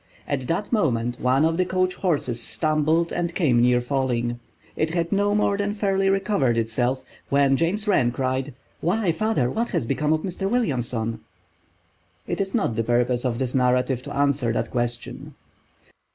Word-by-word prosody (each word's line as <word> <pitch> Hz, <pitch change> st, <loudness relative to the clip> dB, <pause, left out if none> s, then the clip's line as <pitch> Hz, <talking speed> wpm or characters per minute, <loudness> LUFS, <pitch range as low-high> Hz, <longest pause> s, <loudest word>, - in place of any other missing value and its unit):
At 130 Hz, -3 st, -2 dB
that 175 Hz, +5 st, -2 dB
moment 120 Hz, -, 0 dB
one 130 Hz, +4 st, +3 dB
of 165 Hz, 0 st, +1 dB
the 185 Hz, -, +3 dB
coach 185 Hz, 0 st, 0 dB
horses 145 Hz, -11 st, -1 dB
stumbled 155 Hz, +5 st, +1 dB
and 175 Hz, -1 st, -2 dB
came 130 Hz, -10 st, +3 dB
near 125 Hz, 0 st, +4 dB
falling. 120 Hz, -2 st, -1 dB, 0.4 s
It 160 Hz, +2 st, -1 dB
had 170 Hz, -1 st, -1 dB
no 205 Hz, 0 st, +2 dB
more 205 Hz, -1 st, +2 dB
than 205 Hz, 0 st, -1 dB
fairly 195 Hz, -2 st, +1 dB
recovered 195 Hz, -, +1 dB
itself 120 Hz, +3 st, 0 dB, 0.3 s
when 140 Hz, -1 st, +3 dB
James 190 Hz, +8 st, 0 dB
Wren 130 Hz, -12 st, +3 dB
cried: 130 Hz, 0 st, -2 dB, 0.2 s
"Why, 190 Hz, +2 st, +1 dB
father, 165 Hz, -, 0 dB
what 230 Hz, +2 st, -1 dB
has -, -, -1 dB
become 150 Hz, +5 st, 0 dB
of 155 Hz, 0 st, +1 dB
Mr. 195 Hz, +1 st, -3 dB
Williamson?" 120 Hz, -, -1 dB, 1.1 s
It -, -, -2 dB
is 195 Hz, +2 st, -2 dB
not 195 Hz, -, 0 dB
the 115 Hz, -, 0 dB
purpose 120 Hz, +1 st, +1 dB
of 120 Hz, -2 st, 0 dB
this 130 Hz, -1 st, -2 dB
narrative 125 Hz, 0 st, +2 dB
to 145 Hz, +2 st, -8 dB
answer 140 Hz, -4 st, +1 dB
that -, -, -2 dB
question. 120 Hz, -1 st, -4 dB
140 Hz, 165 wpm, -24 LUFS, 125-185 Hz, 1.1 s, near